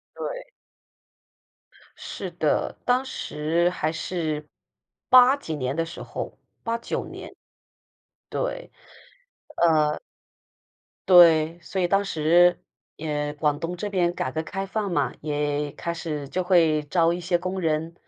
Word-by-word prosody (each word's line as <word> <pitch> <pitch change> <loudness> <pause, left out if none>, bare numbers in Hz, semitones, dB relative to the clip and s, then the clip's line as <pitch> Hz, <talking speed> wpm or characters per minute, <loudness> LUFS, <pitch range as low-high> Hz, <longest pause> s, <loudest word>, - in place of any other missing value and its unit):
对。 - - -6 1.5
是 - - -6
的， - - 0
当 250 +2 +2
时 170 - -1
还 155 -3 -2
是 155 -2 -3 0.6
8 255 +2 +7
几 160 - -6
年 130 0 -2
的 165 - +1
时 165 - -8
候， - - -6 0.2
89 230 0 -3
年。 - - -10 1.0
对， - - -3 1.0
呃 155 -2 +2 1.1
对， 165 -2 +7
所 190 - -3
以 175 - +1
当 195 +1 +2
时， 175 +1 +4 0.4
也 150 -1 -2
广 150 -1 0
东 170 +2 -4
这 205 - -3
边 175 -3 +1
改 130 - -2
革 160 +4 -3
开 195 +4 -4
放 200 -1 -2
嘛， 145 -4 0
也 145 -1 -1
开 170 0 -4
始 150 -4 -5
就 185 +3 -2
会 165 -5 +3
招 165 +3 +2
一 - - -4
些 175 0 0
工 185 +2 -4
人， 160 +1 -1
165 Hz, 135 characters per minute, -25 LUFS, 155-185 Hz, 1.5 s, 8